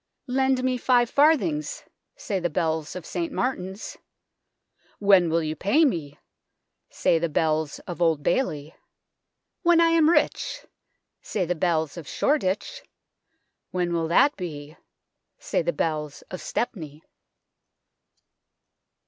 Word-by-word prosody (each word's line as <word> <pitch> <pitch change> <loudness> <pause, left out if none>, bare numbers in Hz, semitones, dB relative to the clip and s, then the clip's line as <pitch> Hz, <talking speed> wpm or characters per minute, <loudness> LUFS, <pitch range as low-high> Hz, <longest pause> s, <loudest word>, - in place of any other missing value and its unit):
" - - -56
' - - -57
Lend 265 -1 +2
me 255 -1 +1
five 245 -1 +2
farthings/ 305 +1 +2 0.3
Say 200 -5 -3
the 175 -1 -1
bells 160 0 -2
of 180 -3 -7
St 335 -3 -3
Martin's. 200 -7 -3 0.5
' - - -56 0.3
When 195 -4 +5
will 165 0 +1
you 155 0 -3
pay 240 - +3
me? 155 - -2 0.4
' - - -56 0.2
Say 165 - +1
the 170 0 -1
bells 155 0 0
of 175 0 -7
Old 160 -4 +2
Bailey. 160 - -1 0.4
' - - -57
When 345 -2 +4
I 335 0 +5
am 325 -2 +4
rich,' 340 - 0 0.6
Say 190 -4 -2
the 175 - 0
bells 160 -2 -1
of 160 -4 -8
Shoreditch. 290 - -1 0.5
' - - -49
When 175 -1 -1
will 165 -1 0
that 280 - +4
be? 155 -4 -7 0.3
' - - -57 0.3
Say - - -1
the - - 0
bells 155 - -3
of 185 - -6
Stepney." 160 - -4
180 Hz, 145 wpm, -25 LUFS, 160-265 Hz, 0.6 s, When